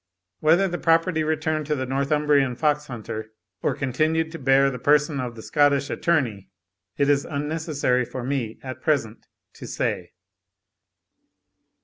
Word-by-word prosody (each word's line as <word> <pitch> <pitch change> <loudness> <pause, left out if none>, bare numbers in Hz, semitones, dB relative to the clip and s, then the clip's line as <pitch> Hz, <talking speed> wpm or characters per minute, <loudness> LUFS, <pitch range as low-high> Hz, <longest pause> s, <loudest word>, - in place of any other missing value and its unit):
Whether 170 +5 +4
the 175 -1 -4
property 165 0 +2
returned 155 -1 -1
to 150 - +1
the 130 -2 -2
Northumbrian 140 0 +1
fox 150 +1 0
hunter, 110 -3 -7 0.3
or - - 0
continued 155 +5 0
to 165 - -7
bear 135 +1 +4
the 125 - -6
person 150 +1 +2
of 125 -2 -4
the 110 - -10
Scottish 145 -1 +2
attorney, 125 - 0 0.5
it 140 - +2
is 145 -1 +3
unnecessary 150 -3 -1
for 125 +1 -6
me 125 -4 -2
at 130 -1 -7
present 130 -7 -1 0.3
to - - -10
say. - - -3
145 Hz, 140 wpm, -24 LUFS, 130-155 Hz, 0.5 s, Whether